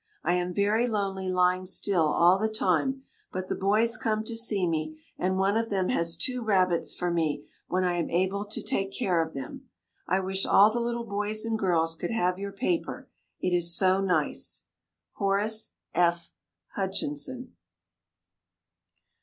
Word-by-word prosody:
I 175 - +2
am 180 0 0
very 210 +5 +2
lonely 195 -4 -2
lying 185 0 +2
still 180 -3 +1
all 175 +5 +4
the 220 +1 +1
time, 220 +6 0 0.3
but 185 0 -5
the - - 0
boys 215 +4 +2
come 215 -1 0
to 225 +1 -4
see 215 -5 +1
me, 155 -1 -2 0.2
and 185 +1 0
one 195 +2 +2
of 225 0 0
them 190 -2 0
has 170 0 0
two 250 +8 -2
rabbits 185 -5 +1
for 180 -1 -1
me 155 -4 -1 0.2
when 185 +1 0
I 180 -1 +1
am 170 - -1
able 190 +4 0
to 205 - -5
take 195 0 -1
care 180 -3 +1
of 160 -2 -4
them. 135 -2 -7 0.4
I 185 +2 +2
wish 190 0 -2
all 205 +2 +6
the 240 - 0
little 235 0 -2
boys 210 +1 -2
and 225 0 0
girls 170 -6 +1
could 175 +2 -4
have 180 -5 0
your 200 0 -4
paper, 325 - -2 0.3
it 180 - 0
is 170 -1 +2
so 190 0 +3
nice. 175 -6 0 0.5
HORACE 205 +2 +1 0.2
F. 170 -1 +1 0.4
HUTCHINSON. 260 +6 -2
190 Hz, 165 wpm, -27 LUFS, 175-215 Hz, 0.5 s, all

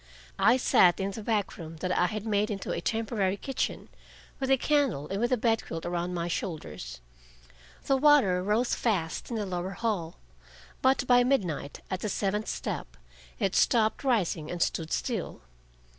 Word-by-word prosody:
I 250 - +5
sat 180 -8 +4
in 195 +1 -1
the 220 - -7
back 210 -2 -1
room 165 -1 -8
that 180 +3 -2
I 180 - +3
had 215 +3 -5
made 210 -1 +1
into 200 -2 -4
a - - -2
temporary 215 -4 -1
kitchen, 270 +5 -3 0.5
with 265 -1 -2
a 270 - +5
candle, 265 - +1
and 195 +2 -2
with 240 - +1
a 255 - +3
bedquilt 225 -8 -1
around 175 +1 -2
my 170 0 -2
shoulders. 150 - -5 0.8
The 270 - +3
water 265 -11 +5
rose 215 +6 +1
fast 185 -9 -1
in 235 - -3
the 215 -2 -1
lower 185 0 -3
hall, 195 -8 -2 0.6
but 260 -1 +3
by 245 -1 +5
midnight, 185 - -1
at 185 - -1
the 215 - -3
seventh 205 +2 -1
step, - - -4 0.4
it 195 -4 0
stopped 220 0 +3
rising 190 - 0
and 175 - -4
stood 165 -1 -1
still. 225 - -3
200 Hz, 170 wpm, -28 LUFS, 175-235 Hz, 0.8 s, I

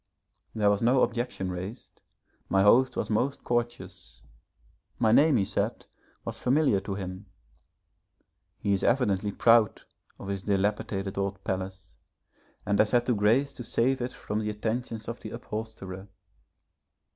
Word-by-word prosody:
There 105 -2 +3
was 100 - 0
no 125 +3 +4
objection 120 -6 -2
raised, 90 +6 -8 0.5
my 95 0 +3
host 125 +5 +5
was - - -2
most 130 +6 0
courteous, 120 0 -3 0.7
my 110 -2 +3
name, 145 +3 +5
he 100 - +2
said, - - -2 0.4
was - - -5
familiar 130 -5 +3
to 100 0 -5
him; 95 +1 -6 1.3
he 100 -1 0
is 95 - 0
evidently 105 -5 +2
proud 115 0 +4 0.3
of - - -9
his 100 -1 -2
dilapidated 100 -1 -1
old 100 0 -3
palace, 95 0 -5 0.7
and 100 -1 +1
has 105 - +5
had 120 -1 +2
the 125 - +2
grace 115 +7 +2
to 125 - -7
save 130 +3 +1
it 125 +1 -2
from 105 -3 -4
the 105 -1 -2
attentions 110 +1 -3
of 115 +1 -5
the - - -7
upholsterer. 105 -4 -7
105 Hz, 145 wpm, -28 LUFS, 100-120 Hz, 1.3 s, host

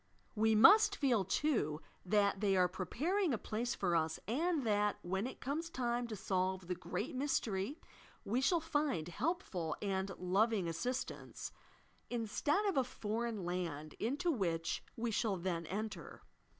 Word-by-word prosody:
We 220 0 +3
must 415 - +8
feel, 250 - +2
too. 190 - +1 0.2
that 200 +1 +2
they 195 -2 +3
are 180 -1 +5
preparing 290 - 0
a - - -3
place 230 +3 -2
for 175 -3 +1
iis 160 -1 +1
and 310 - +1
that, 210 -1 +2
when 190 +5 -1
it - - -8
comes 310 +5 -3
time 240 -4 -1
to 220 - -4
solve 190 -1 -1
the 180 - 0
Great 210 - -4
Mystery, 255 -2 -1 0.5
we 235 +6 +1
shall 335 +6 +3
find 290 - 0
helpful 180 - -2
and 195 -1 -1
loving 195 +1 +2
assistance, 245 +11 -4 0.6
instead 245 - 0
of 390 -7 +1
a 265 - +5
foreign 225 -4 -3
land, 165 -4 -3
into 290 +10 0
which 170 - -1
we 235 0 -1
shall 215 -3 +1
then 170 -2 -2
enter. 210 -3 -5
215 Hz, 150 wpm, -36 LUFS, 185-265 Hz, 0.6 s, must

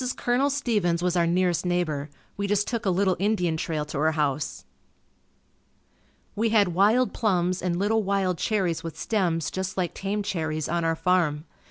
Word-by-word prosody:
Colonel 250 +4 +1
Stevens 210 -11 0
was 180 0 +1
our 170 -1 +3
nearest 175 0 +1
neighbor. 165 -5 -1 0.3
We 200 0 -2
just 205 0 +1
took 230 -4 -2
a - - +4
little 190 0 +2
Indian 190 -5 +1
trail 160 -1 -2
to 150 -1 -5
her 160 +1 +2
house. 150 -2 -2 1.7
We 225 +2 +1
had 210 -4 +4
wild 210 +8 +3
plums 185 -4 0
and 175 -2 -1
little 215 +4 +1
wild 190 -3 0
cherries 190 -7 0
with 165 -1 -6
stems 170 -8 0
just 190 0 -4
like 180 -3 -1
tame 205 +2 -3
cherries, 155 -5 -2
on 170 0 -1
our 165 0 +1
farm. 165 -3 +1
180 Hz, 170 wpm, -26 LUFS, 165-205 Hz, 1.7 s, a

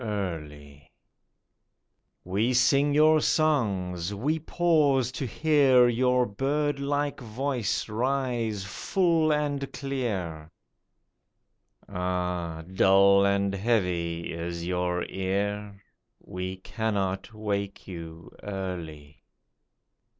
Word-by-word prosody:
WAKENING 105 -3 -3
EARLY 75 -6 -7 1.4
91 90 - -9
We 110 +6 +2
sing 140 +3 +4
your 155 +1 +5
songs; 100 - 0
we 150 +10 -1
pause 150 -6 +2
to 130 0 -4
hear 135 -2 +4
Your 125 +1 +2
bird 140 +6 -1
like 145 +1 -1
voice 125 -1 -2
rise 120 -3 -1
full 165 - +1
and 145 -2 -1
clear; 100 - -4 1.4
Ah! 90 -3 -3
dull 100 +2 +4
and 100 0 +1
heavy 90 -6 -1
is 85 0 -5
your 90 0 -1
ear; 100 +1 -3 0.4
We 90 +1 -5
cannot 95 -1 -2
wake 100 -2 -3
you 85 -2 -9
early. 85 -7 -6
100 Hz, 90 wpm, -27 LUFS, 90-135 Hz, 1.4 s, your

